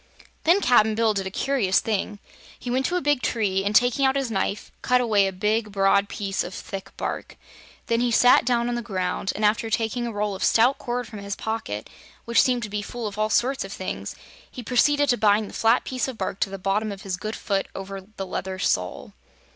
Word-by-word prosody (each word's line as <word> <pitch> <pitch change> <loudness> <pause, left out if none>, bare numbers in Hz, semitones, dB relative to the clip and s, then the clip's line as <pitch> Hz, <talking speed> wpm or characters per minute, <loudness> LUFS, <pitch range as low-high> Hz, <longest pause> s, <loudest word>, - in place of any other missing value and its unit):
Then 350 +5 +5
Cap'n 220 - +4
Bill 225 -1 +2
did 195 -2 -2
a - - -3
curious 215 -3 +1
thing. 210 -1 -2 0.4
He 245 - -5
went 260 +1 +1
to 360 - -2
a 360 - +1
big 290 -3 +1
tree 195 -6 0
and, 205 +1 -1
taking 245 +4 +4
out 265 0 +3
his 270 -4 -1
knife, 200 0 -2
cut 250 0 +3
away 210 -5 +3
a - - -2
big, 210 +3 -1
broad 200 0 +3
piece 195 -2 -2
of 180 - -7
thick 195 -1 -7
bark. - - -5 0.5
Then 230 -2 +1
he 245 0 +1
sat 245 +2 +5
down 235 -1 +1
on 245 - -1
the 240 - -2
ground 190 -4 -2
and 215 - 0
after 225 +2 +2
taking 235 +2 -1
a - - -3
roll 210 -1 -2
of 190 - -4
stout 245 +4 +4
cord 245 -1 -3
from 215 -2 -9
his 200 0 -4
pocket 220 - -4 0.4
which 235 0 +4
seemed 245 -2 +1
to - - -3
be 205 0 -3
full 235 +2 -6
of 210 0 -5
all 215 0 +1
sorts 260 +5 +1
of - - -8
things - - -5 0.3
he 250 - -8
proceeded 290 +5 +3
to 245 - +3
bind 210 0 +3
the - - -12
flat 225 +2 +3
piece 255 0 -2
of 260 -4 -6
bark 190 -1 -3
to - - 0
the 195 - -6
bottom 200 +3 -1
of 195 -1 -8
his 190 -2 -2
good 215 +4 -5
foot, 195 -2 -1
over 195 0 -6
the 195 0 -8
leather 190 0 -4
sole. 90 - -1
215 Hz, 230 wpm, -24 LUFS, 195-245 Hz, 0.5 s, Then